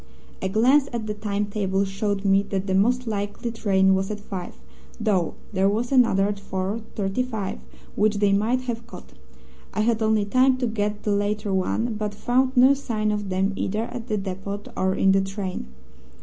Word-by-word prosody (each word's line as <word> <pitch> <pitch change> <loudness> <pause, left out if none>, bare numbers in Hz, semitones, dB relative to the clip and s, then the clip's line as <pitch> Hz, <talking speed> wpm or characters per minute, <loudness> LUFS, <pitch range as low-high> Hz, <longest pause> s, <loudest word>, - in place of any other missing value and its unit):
"A 190 - -1
glance 255 +8 +4
at 230 -2 -3
the 210 - -2
time 210 -1 -2
table 200 -1 0
showed 200 +1 -2
me 195 0 +5
that 195 -1 -1
the 190 - -1
most 245 +6 +2
likely 205 +1 -3
train 190 -4 +3
was 190 0 0
at 210 -1 -4
five, 190 -3 -7 0.4
though 200 -7 +1 0.2
there 195 0 +3
was 230 +5 -1
another 230 -7 +4
at 205 0 -2
4:35 200 - -3 0.3
which 210 0 +2
they 205 -1 +3
might 225 +6 +2
have 235 -2 -5
caught. - - -12 0.6
I 215 - +1
had 225 0 +1
only 220 -1 +2
time 255 +4 +3
to 255 - -1
get 210 -2 -2
the 210 - 0
later 205 0 0
one, 225 +5 0
but 210 -1 -3
found 255 +4 +1
no 260 +3 +7
sign 220 -6 -1
of 205 -2 -2
them 190 +2 0
either 210 +3 -1
at 235 0 -6
the 215 -3 0
depot 195 +1 -4
or 190 0 +1
in 195 - +4
the 195 0 +4
train. 195 - -4
210 Hz, 185 wpm, -24 LUFS, 195-225 Hz, 0.6 s, no